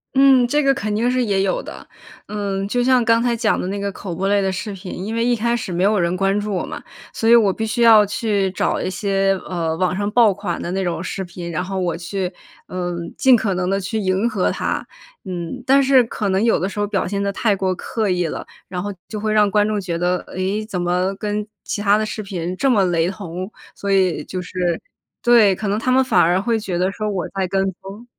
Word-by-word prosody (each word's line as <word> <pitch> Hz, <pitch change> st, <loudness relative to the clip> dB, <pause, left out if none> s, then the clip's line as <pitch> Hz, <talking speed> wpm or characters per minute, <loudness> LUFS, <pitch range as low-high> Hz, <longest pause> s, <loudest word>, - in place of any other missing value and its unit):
嗯， 265 Hz, -2 st, +6 dB
这 295 Hz, +4 st, +2 dB
个 275 Hz, -1 st, +4 dB
肯 210 Hz, -4 st, -3 dB
定 235 Hz, +3 st, +1 dB
是 250 Hz, 0 st, +1 dB
也 195 Hz, -3 st, +1 dB
有 195 Hz, -1 st, 0 dB
的。 -, -, -10 dB, 0.4 s
嗯， 200 Hz, -2 st, -3 dB
就 245 Hz, +3 st, 0 dB
像 255 Hz, -1 st, +4 dB
刚 230 Hz, 0 st, +3 dB
才 240 Hz, -1 st, +1 dB
讲 225 Hz, -1 st, +1 dB
的 -, -, -3 dB
那 200 Hz, +1 st, -3 dB
个 200 Hz, 0 st, -2 dB
口 190 Hz, -2 st, -7 dB
播 190 Hz, +3 st, -1 dB
类 200 Hz, 0 st, +2 dB
的 190 Hz, -, 0 dB
视 205 Hz, +3 st, -4 dB
频， 190 Hz, -1 st, -7 dB
因 205 Hz, +5 st, -4 dB
为 230 Hz, 0 st, +1 dB
一 245 Hz, 0 st, +3 dB
开 235 Hz, +2 st, 0 dB
始 205 Hz, -5 st, -5 dB
没 180 Hz, +2 st, 0 dB
有 205 Hz, 0 st, +3 dB
人 170 Hz, +1 st, +1 dB
关 195 Hz, +2 st, +1 dB
注 205 Hz, 0 st, -3 dB
我 185 Hz, -, -1 dB
嘛， -, -, -7 dB, 0.3 s
所 225 Hz, -, -2 dB
以 235 Hz, -, +8 dB
我 210 Hz, -4 st, +5 dB
必 220 Hz, +4 st, -3 dB
须 220 Hz, +2 st, -2 dB
要 220 Hz, -3 st, +7 dB
去 205 Hz, -2 st, 0 dB
找 185 Hz, -, 0 dB
一 -, -, -2 dB
些， 195 Hz, 0 st, +1 dB, 0.2 s
呃， 165 Hz, -3 st, -1 dB
网 185 Hz, +2 st, 0 dB
上 205 Hz, 0 st, -1 dB
爆 230 Hz, -3 st, +5 dB
款 200 Hz, +2 st, -4 dB
的 -, -, -4 dB
那 190 Hz, 0 st, -1 dB
种 175 Hz, -1 st, -2 dB
视 190 Hz, +1 st, -4 dB
频， 175 Hz, -1 st, -7 dB
然 170 Hz, +2 st, -2 dB
后 190 Hz, 0 st, -3 dB
我 170 Hz, -2 st, -1 dB
去， 180 Hz, +2 st, -3 dB, 0.4 s
嗯， 175 Hz, -2 st, -4 dB
尽 260 Hz, -2 st, +6 dB
可 200 Hz, -5 st, 0 dB
能 180 Hz, 0 st, -1 dB
地 195 Hz, 0 st, 0 dB
去 220 Hz, +4 st, -3 dB
迎 195 Hz, +3 st, +1 dB
合 200 Hz, -5 st, 0 dB
它， -, -, -2 dB, 0.4 s
嗯。 180 Hz, +7 st, -5 dB
但 275 Hz, +1 st, +5 dB
是 265 Hz, -1 st, +5 dB
可 215 Hz, -3 st, -3 dB
能 190 Hz, +3 st, +1 dB
有 230 Hz, -, +3 dB
的 190 Hz, -, -1 dB
时 205 Hz, -, -6 dB
候 205 Hz, -, +2 dB
表 200 Hz, -3 st, -1 dB
现 200 Hz, +1 st, -2 dB
得 200 Hz, 0 st, -1 dB
太 210 Hz, -2 st, +1 dB
过 190 Hz, -1 st, 0 dB
刻 215 Hz, +3 st, -3 dB
意 180 Hz, -1 st, 0 dB
了， -, -, -5 dB, 0.2 s
然 180 Hz, 0 st, -4 dB
后 205 Hz, -1 st, -4 dB
就 215 Hz, -, -5 dB
会 215 Hz, 0 st, -1 dB
让 210 Hz, -1 st, +4 dB
观 210 Hz, +1 st, +2 dB
众 210 Hz, -2 st, -1 dB
觉 170 Hz, -3 st, -3 dB
得， 180 Hz, +1 st, 0 dB
咦， 205 Hz, +3 st, -1 dB
怎 185 Hz, -5 st, -3 dB
么 180 Hz, +2 st, 0 dB
跟 210 Hz, +1 st, -3 dB, 0.2 s
其 205 Hz, -, -3 dB
它 205 Hz, 0 st, +4 dB
的 215 Hz, -, 0 dB
视 215 Hz, 0 st, -5 dB
频 180 Hz, -3 st, -4 dB
这 270 Hz, +7 st, +1 dB
么 205 Hz, -6 st, +4 dB
雷 170 Hz, 0 st, +1 dB
同， 185 Hz, 0 st, -6 dB, 0.2 s
所 200 Hz, 0 st, -4 dB
以 185 Hz, -4 st, +2 dB
就 185 Hz, -, -5 dB
是 175 Hz, -1 st, -2 dB, 0.4 s
对， 230 Hz, -6 st, +5 dB
可 210 Hz, -, -4 dB
能 205 Hz, +2 st, 0 dB
他 255 Hz, -, 0 dB
们 265 Hz, +1 st, +4 dB
反 260 Hz, -, +3 dB
而 175 Hz, +3 st, +3 dB
会 225 Hz, +2 st, 0 dB
觉 190 Hz, -4 st, -3 dB
得 185 Hz, +2 st, +1 dB
说 215 Hz, +1 st, -3 dB
我 190 Hz, -3 st, -2 dB
在 190 Hz, -1 st, -2 dB
跟 195 Hz, +1 st, +1 dB, 0.2 s
风。 200 Hz, +5 st, -10 dB
200 Hz, 270 characters per minute, -20 LUFS, 185-220 Hz, 0.4 s, 以